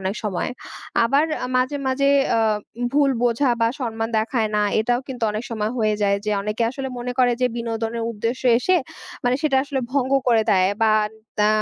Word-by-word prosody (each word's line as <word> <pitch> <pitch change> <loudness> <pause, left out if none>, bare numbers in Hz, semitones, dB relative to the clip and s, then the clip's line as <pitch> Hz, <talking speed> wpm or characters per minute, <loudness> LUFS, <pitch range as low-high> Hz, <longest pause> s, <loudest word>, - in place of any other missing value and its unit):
অনেক 190 +2 -2
সময়। 195 +1 -2 0.5
আবার 275 +6 +3 0.2
আ - - -1
মাঝে, 255 +3 +1
মাঝে 275 +1 +2 0.3
আ - - +2 0.5
ভুল 285 -1 +3
বোঝা 245 +2 +2
বা 230 - +4
সম্মান 225 -2 -2
দেখায় 220 0 0
না 210 - +2 0.2
এটাও 240 +2 +1
কিন্তু 255 -3 -7
অনেক 215 +3 -4
সময় 215 -1 -2
হয়ে 215 -1 +2
যায়। 200 0 +3
যে - - +1
অনেকে 210 +3 -2
আসলে 265 0 -5
মনে 245 +1 -4
করে 250 -1 +4
যে 250 - +4
বিনোদনের 230 0 -3
উদ্দেশ্যে 235 +4 -1
এসে 365 +9 +2 0.5
মানে 245 +1 +2
সেটা 280 -3 +2
আসলে 280 -2 -2
ভঙ্গ 270 -1 0 0.2
করে 225 -2 +4
দেয়। 185 -2 +4
বা 220 - +4 0.5
দা 210 0 +4
235 Hz, 185 wpm, -22 LUFS, 220-260 Hz, 0.5 s, বা